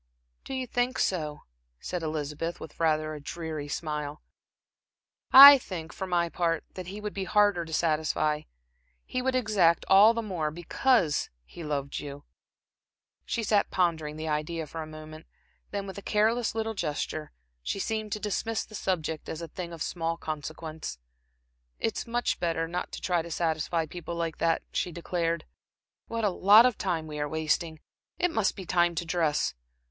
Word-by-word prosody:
"Do 270 - -4
you 260 -1 -2
think 245 +1 0
so?" 155 -5 -1 0.4
said 180 -1 -4
Elizabeth, 155 +1 -3
with 160 - -10
rather 155 -1 +1
a 150 - -6
dreary 155 -1 -5
smile. 150 -1 -4 1.1
"I 280 +1 +12
think, 170 -8 -7
for 190 - -5
my 175 -1 +1
part, 165 -1 0
that 185 -2 -7
he 200 +3 -6
would 210 0 -5
be 195 -1 -3
harder 205 -4 +3
to 160 - -10
satisfy, 155 -1 +1 0.6
he 255 - -2
would 260 0 0
exact 205 -9 +3
all 205 +4 +7
the 230 - -1
more, 175 -7 -2
because 175 - +1 0.2
he 170 - -10
loved 140 -2 -3
you." 145 0 -8 1.0
She 230 - -2
sat 205 -1 +2
pondering 160 -4 0
the 160 0 -4
idea 155 +2 -2
for 160 +2 -6
a 155 - -6
moment, 155 0 -10 0.4
then 200 -1 -3
with 195 0 -7
a - - -10
careless 220 +3 +1
little 225 0 -1
gesture, 155 -3 -3 0.3
she - - -3
seemed 215 +1 -2
to 215 - -3
dismiss 220 +2 -2
the - - -17
subject 160 -6 -2
as 160 - -4
a 165 - -7
thing 175 +1 -6
of 165 -2 -4
small 165 -1 -2
consequence. 155 - -6 0.8
"It's 225 - -2
much 240 +1 -1
better 165 -1 0
not 175 +2 -4
to - - -6
try 175 -2 +1
to 170 - -9
satisfy 165 0 0
people 170 +1 -7
like 165 -2 -3
that," 165 -1 +1
she 180 - -1
declared. 170 -1 -2 0.6
"What 230 -1 -3
a 205 - +3
lot 205 +6 +7
of 250 -3 +3
time 170 -5 -2
we 150 -1 -6
are 145 0 -1
wasting! 160 +1 -1 0.4
It 355 - +1
must 220 -9 +1
be 190 - -7
time 175 0 +2
to 170 - -2
dress." 160 - +1
170 Hz, 175 wpm, -28 LUFS, 155-200 Hz, 1.1 s, I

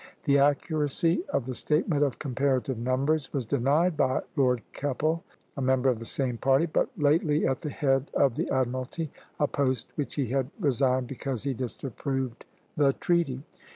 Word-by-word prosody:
The 140 -2 +4
accuracy 150 +4 +2
of 130 - 0
the 130 - -4
statement 150 +3 +1
of 140 -4 0
comparative 130 -2 0
numbers 135 +5 0
was 135 -4 -2
denied 140 +8 +2
by 130 -3 +1
Lord 125 -5 +2
Keppel, 155 +5 -1 0.3
a 140 - -4
member 130 0 +3
of 120 - -3
the 115 - -8
same 125 -4 -1
party, 135 +3 +3
and 170 - -3
but - - +2
lately 150 0 +2
at 130 - 0
the 150 - -3
head 135 -2 +1
of 135 -4 +4
the - - -2
admiralty, 130 +4 -2 0.3
a 145 - +4
post 130 -5 -1
which 145 - -4
he 135 -6 -1
had 135 0 0
resigned 130 - +2
because 130 -1 -4
he 140 -1 -1
disapproved 130 0 -4 0.3
the 140 -2 +3
treaty. 160 -7 0
135 Hz, 170 wpm, -28 LUFS, 130-150 Hz, 0.3 s, The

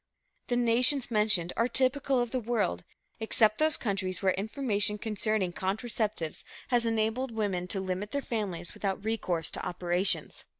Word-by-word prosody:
The 245 - 0
nations 245 +2 +3
mentioned 210 -6 +2
are 230 - +2
typical 265 +1 +2
of 240 -1 -1
the 255 - -1
world, 215 - -1 0.4
except 220 -1 +3
those 310 0 +4
countries 190 -4 -1
where 190 -2 +2
information 210 -1 -1
concerning 210 -3 -1
contraceptives 210 -3 -2 0.3
has 240 -2 +2
enabled 225 +3 0
women 200 -5 -2
to 195 - 0
limit 190 +2 -3
their 280 +3 -3
families 190 -7 -4
without 195 0 -3
recourse 185 -7 -1
to - - -3
operations. 180 +1 0
215 Hz, 145 wpm, -29 LUFS, 190-240 Hz, 0.4 s, those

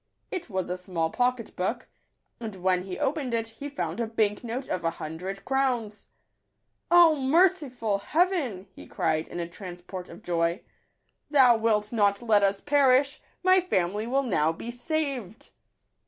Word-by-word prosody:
It 360 -6 -4
was 185 -3 -2
a 180 - -2
small 170 -3 -2
pocket 250 -2 -1
book; 225 +7 -2 0.5
and 220 -4 -6
when 185 0 +1
he 185 0 -6
opened 275 -4 -1
it, 225 -1 -1
he 280 +6 -7
found 280 -4 -4
a 230 - 0
bank 215 -1 0
note 245 +3 -4
of 180 - -3
a 165 - +2
hundred 180 +5 -6
crowns. 250 -6 -1 0.4
" - - -50
O 345 -2 +7
merciful 270 - +2
Heaven 300 - 0
!" - - -40
he - - -12
cried, 160 -3 -1
in 175 - -6
a 170 - -3
transport 180 0 -8
of 170 - -12
joy, 170 +1 0 0.3
" - - -48
Thou 260 -5 +6
wilt 215 -1 +1
not 200 -3 +3
let 220 -4 +3
us 200 0 +1
perish: 275 -1 +3 0.2
my 370 0 +6
family 205 - -1
will 270 +3 +1
now 160 - +2
be 230 +8 -7
saved 275 - -4
225 Hz, 170 wpm, -27 LUFS, 185-270 Hz, 0.5 s, O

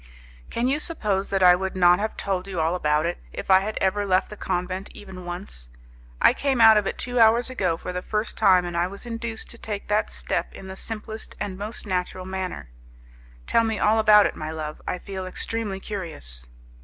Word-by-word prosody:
"Can 235 - -1
you 280 +3 +1
suppose 210 - 0
that 195 -1 +1
I 180 0 +8
would 190 +1 -3
not 180 0 +5
have 215 +1 -3
told 190 -1 -2
you 185 -3 -4
all 160 +2 +1
about 150 -3 +1
it, 175 - -2
if - - -4
I 190 - +8
had 215 +3 -4
ever 200 +2 +1
left 190 0 +1
the - - -6
convent, 185 0 -3
even 190 -3 -10
once? 175 - -7 0.5
I - - +6
came 275 -3 0
out 220 -1 +9
of 210 -2 +2
it - - -3
two 245 0 -2
hours 230 +3 +5
ago, 185 -9 0
for 180 - -6
the 180 - -3
first 215 +3 -2
time, 180 -2 +4
and 175 -1 -5
I 170 +1 +1
was 200 +5 -8
induced 230 -1 -5
to 235 - -12
take 205 -2 -5
that 210 +1 +1
step - - -2
in 195 - -10
the 190 0 -7
simplest, 220 +1 -6
the 205 - -2
most 205 +5 -6
natural 185 -1 -2
manner." 185 - -5 0.7
"Tell 230 - +3
me 220 -1 -1
all 215 +2 +3
about 210 -1 +7
it, - - -1
my 155 0 -5
love. 155 -1 -5
I - - -1
feel 190 0 -6
extremely 205 +1 -4
curious." 155 - -7
195 Hz, 215 wpm, -24 LUFS, 180-215 Hz, 0.7 s, out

